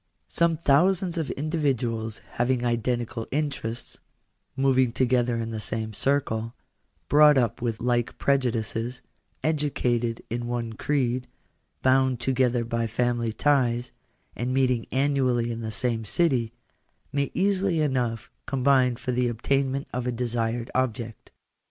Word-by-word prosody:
Some 170 -1 +1
thousands 175 +4 +2
of 155 - -2
individuals 130 -8 -1 0.2
having 125 0 +1
identical 120 -1 -1
interests, 135 -6 -3 0.6
moving 130 -2 +3
together 125 -1 +2
in 115 0 -3
the 110 - -4
same 110 0 -3
circle, 115 -2 0 0.5
brought 150 -1 +6
up 120 -2 +1
with 115 -2 -2
like 120 -1 0
prejudices, 120 -2 0 0.4
educated 125 -7 0
in 120 +1 -3
one 120 -2 -3
creed, 125 0 -1 0.6
bound 130 -1 +3
together 125 -1 +1
by 115 0 -1
family 120 0 0
ties, 125 -2 +1 0.4
and 125 +2 -2
meeting 130 -3 +1
annually 130 -4 +1
in 115 0 -4
the 110 - -4
same 115 +1 -1
city, 125 - +1 0.6
may 140 -1 0
easily 190 -2 +1
enough 125 -6 -1 0.2
combine 130 -2 +3
for 125 +2 -4
the 125 0 +1
obtainment 135 +4 0
of 125 0 -2
a - - +1
desired 120 -1 -2
object. 120 -3 -2
125 Hz, 125 wpm, -26 LUFS, 115-135 Hz, 0.6 s, brought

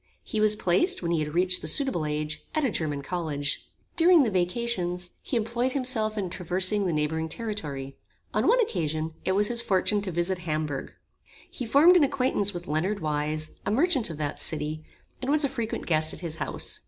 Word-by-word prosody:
He 215 - -3
was 215 0 +5
placed, 210 - +2
when 170 - -1
he 170 - +2
had 150 +1 -3
reached 185 +1 +2
the - - -5
suitable 265 - +2
age, 150 +1 -3
at 310 - +1
a 250 - +1
German 150 -5 -2
college. 150 -5 -3 0.3
During 340 -2 +6
the 225 - 0
vacations, 180 -2 -1
he 250 - -2
employed 235 +3 0
himself 235 -5 +1
in 190 -4 -2
traversing 185 +3 +1
the - - 0
neighbouring 160 +1 -1
territory. 150 - -4 0.4
On - - +1
one - - +5
occasion 160 - -1
it 190 - +2
was 205 +2 +2
his 235 -1 0
fortune 205 -1 +1
to 195 -2 -4
visit 175 +2 0
Hamburg. 155 -5 -3 0.6
He 250 - -5
formed 315 +9 +7
an 330 - +5
acquaintance 255 -7 +1
with 175 -1 -7
Leonard 180 +7 0
Weise, 155 0 -2
a - - -2
merchant 270 - +2
of 160 - -6
that 150 -1 -3
city, 155 0 -2 0.4
and 260 - -3
was 300 0 +4
a - - +3
frequent 235 -4 -4
guest 155 -1 +2
at - - -11
his 165 -2 -4
house. - - -2
185 Hz, 195 wpm, -27 LUFS, 155-235 Hz, 0.6 s, formed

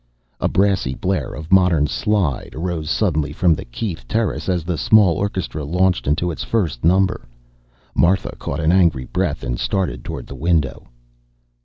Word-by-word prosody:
A - - +1
brassy 95 -9 +1
blare 90 -10 -2
of 80 +5 -9
modern 90 -6 +4
"slide" 75 - -1
arose 80 -2 -3
suddenly 80 -4 0
from 85 +2 +3
the - - -5
Keith 85 - -5
terrace 110 -3 -1
as 90 -3 0
the 85 +1 -2
small 100 +1 +4
orchestra 95 -6 -3
launched 90 +3 +1
into 80 +5 +1
its 80 - -5
first 85 - -1
number. 90 -4 +2 0.7
Martha 90 +2 +2
caught 70 - -4
an 80 +1 +2
angry 85 -8 +3
breath - - -2
and - - -3
started 90 -12 -1
toward - - -6
the - - -9
window. 80 0 -1
85 Hz, 160 wpm, -20 LUFS, 75-95 Hz, 0.7 s, modern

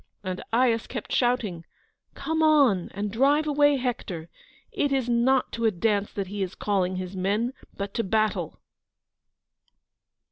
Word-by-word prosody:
And 185 -1 -4
Aias 230 -1 +2
kept 235 -5 -6
shouting: 240 -9 0 0.5
"Come 320 0 -2
on, 280 - +4
and 205 +1 -3
drive 280 +7 +3
away 290 -1 +4
Hector; 195 -10 -4 0.4
it 285 - 0
is 265 -3 +1
not 245 +2 +2
to 230 0 -2
a - - +6
dance 205 +1 0
that 200 - -2
he 200 +2 -5
is 190 -1 -3
calling 185 -3 0
his 185 +1 -5
men, 205 +7 0 0.2
but 200 0 -4
to 230 - -1
battle." 215 +2 0
225 Hz, 145 wpm, -26 LUFS, 195-260 Hz, 0.5 s, a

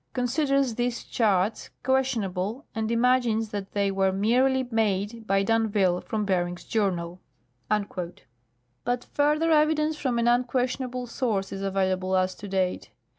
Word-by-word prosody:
considers 270 0 +1
these 240 +1 -2
charts 210 -2 0
questionable 245 - 0
and 220 0 -2
imagines 235 -2 +2
that 200 -2 -6
they 200 -1 +1
were 195 0 +2
merely 250 +7 +2
made 220 0 -1
by 195 0 +2
d'Anville 205 -4 +2
from 215 -1 -2
Beering's 175 -2 -1
journal." 180 -5 -1 1.6
But 245 +1 -1
further 300 +3 +2
evidence 305 0 +3
from 255 -5 -1
an 235 0 +1
unquestionable 250 +1 0
source 225 -5 -2
is 195 - -5
available 190 -1 0
as 185 0 +1
to 205 - -9
date. 190 -2 -1
225 Hz, 125 wpm, -26 LUFS, 195-250 Hz, 1.6 s, evidence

